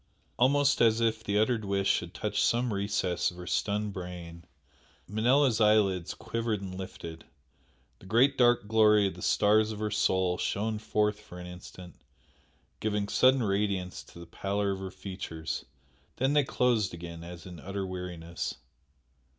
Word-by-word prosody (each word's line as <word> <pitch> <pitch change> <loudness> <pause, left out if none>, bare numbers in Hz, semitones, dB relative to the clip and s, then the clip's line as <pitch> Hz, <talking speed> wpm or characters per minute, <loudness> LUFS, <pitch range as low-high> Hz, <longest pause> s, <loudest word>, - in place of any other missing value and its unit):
Almost 140 +2 +4
as 115 -1 +4
if 115 -1 0
the 100 -1 0
uttered 110 +1 +2
wish 100 -1 +1
had 85 0 -8
touched 105 -1 -1
some 120 -1 +1
recess 100 -3 0
of 90 - -12
her 90 - -8
stunned 105 +2 -1
brain, 90 -2 -8 0.6
Manella's 115 +4 +3
eyelids 100 -5 +3
quivered 115 -1 -2
and 95 -2 -7
lifted, 85 -3 -8 0.8
the 95 - -14
great 125 +7 +4
dark 120 -4 +3
glory 105 -1 +5
of 95 - -1
the 90 - -12
stars 110 +3 +3
of 110 - -6
her 105 0 -2
soul 95 -4 +1
shone 110 +1 -1
forth 105 -1 0
for 100 -4 -12
an 90 - -8
instant, 90 0 -11 0.8
giving 105 -1 -1
sudden 130 0 +4
radiance 100 -3 -1
to - - -16
the 85 - -9
pallor 100 +3 -2
of 95 - -3
her 95 0 -5
features 95 -6 -6 0.5
then 135 +2 +1
they 145 -1 +4
closed 115 -8 +1
again 85 -1 -8
as 85 0 -9
in 90 -2 -9
utter 95 +4 -4
weariness. 90 -2 -5
100 Hz, 160 wpm, -29 LUFS, 90-110 Hz, 0.8 s, glory